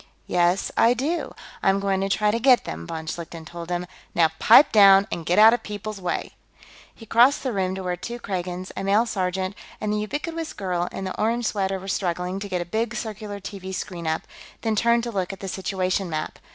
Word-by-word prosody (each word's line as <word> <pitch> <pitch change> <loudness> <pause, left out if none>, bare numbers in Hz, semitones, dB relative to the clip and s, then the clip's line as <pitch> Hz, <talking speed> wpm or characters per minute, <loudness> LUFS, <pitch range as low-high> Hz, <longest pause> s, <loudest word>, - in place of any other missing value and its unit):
"Yes, 175 +1 +1
I 235 +2 +4
do. 300 +8 -2 0.3
I'm 195 0 +3
going 195 -1 0
to 195 - -1
try 210 +1 +2
to 230 - -1
get 255 0 +5
them," 80 +1 -6
von 160 -1 -5
Schlichten 165 0 -6
told 170 +1 -8
him. 175 0 -2 0.3
"Now 165 -2 +4
pipe 240 +7 +7
down 195 -2 +7
and 165 -1 -4
get 175 - +2
out 220 +2 +8
of 240 - 0
people's 210 -1 -6
way." 180 - -2 0.6
He 225 - -13
crossed 240 +6 +4
the 260 -3 -1
room, 190 -1 -1
to 190 - -5
where 180 -1 -1
two 235 +7 -6
Kragans, 185 -4 -4
a - - -4
male 205 +4 +3
sergeant, 190 -3 -2 0.3
and 210 0 -1
the 210 - 0
ubiquitous 315 - -4
girl 180 -3 -2
in - - -5
the 185 - -4
orange 230 +2 +1
sweater 195 -3 0
were 190 - -10
struggling 180 0 -2
to 200 0 -6
get 180 -2 -1
a - - -4
big 220 +5 -2
circular 210 -3 -5
TV 190 -1 -7
screen 175 -5 -5
up, 160 0 -1 0.4
then 220 -1 0
turned 235 +2 +3
to 235 - -3
look 190 -4 -2
at 195 - -9
the 195 - -6
situation 190 0 -1
map. 155 -1 -4
195 Hz, 220 wpm, -24 LUFS, 180-220 Hz, 0.6 s, out